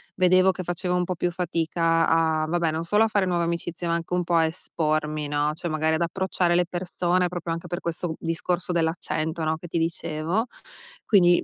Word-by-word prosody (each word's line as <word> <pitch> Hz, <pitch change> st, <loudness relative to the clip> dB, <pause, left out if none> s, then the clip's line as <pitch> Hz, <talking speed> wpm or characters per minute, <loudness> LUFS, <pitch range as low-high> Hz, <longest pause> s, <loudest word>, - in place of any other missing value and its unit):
vedevo 185 Hz, +1 st, +5 dB
che 185 Hz, -, -6 dB
facevo 180 Hz, +1 st, -1 dB
un 180 Hz, -, +2 dB
po' 185 Hz, -, -2 dB
più 175 Hz, +1 st, 0 dB
fatica 165 Hz, -1 st, +1 dB
a 160 Hz, -1 st, +2 dB
vabbè, 170 Hz, 0 st, +1 dB
non 160 Hz, +1 st, -2 dB
solo 210 Hz, +6 st, +3 dB
a -, -, +3 dB
fare 205 Hz, -3 st, +1 dB
nuove 175 Hz, -1 st, +1 dB
amicizie, 170 Hz, +1 st, -3 dB
ma 170 Hz, -, +1 dB
anche 170 Hz, +1 st, -3 dB
un 180 Hz, -, +1 dB
po' 175 Hz, -, -2 dB
a 165 Hz, -1 st, +5 dB
espormi, 155 Hz, -2 st, -2 dB
no, 145 Hz, +1 st, +1 dB
cioè, 165 Hz, +3 st, -5 dB
magari 155 Hz, 0 st, +1 dB
ad 160 Hz, -, -2 dB
approcciare 180 Hz, 0 st, 0 dB
le 175 Hz, 0 st, +3 dB
persone 180 Hz, 0 st, 0 dB
proprio 175 Hz, -1 st, -4 dB
anche 165 Hz, 0 st, -4 dB
per 175 Hz, +1 st, -4 dB
questo 170 Hz, -1 st, -3 dB
discorso 175 Hz, +2 st, -2 dB
dell'accento, 160 Hz, -1 st, -1 dB
no, 160 Hz, 0 st, 0 dB
che 175 Hz, -, -10 dB
ti 170 Hz, -, -2 dB
dicevo. 165 Hz, +5 st, -1 dB, 0.6 s
Quindi 175 Hz, -5 st, +5 dB
170 Hz, 205 wpm, -25 LUFS, 160-180 Hz, 0.6 s, vedevo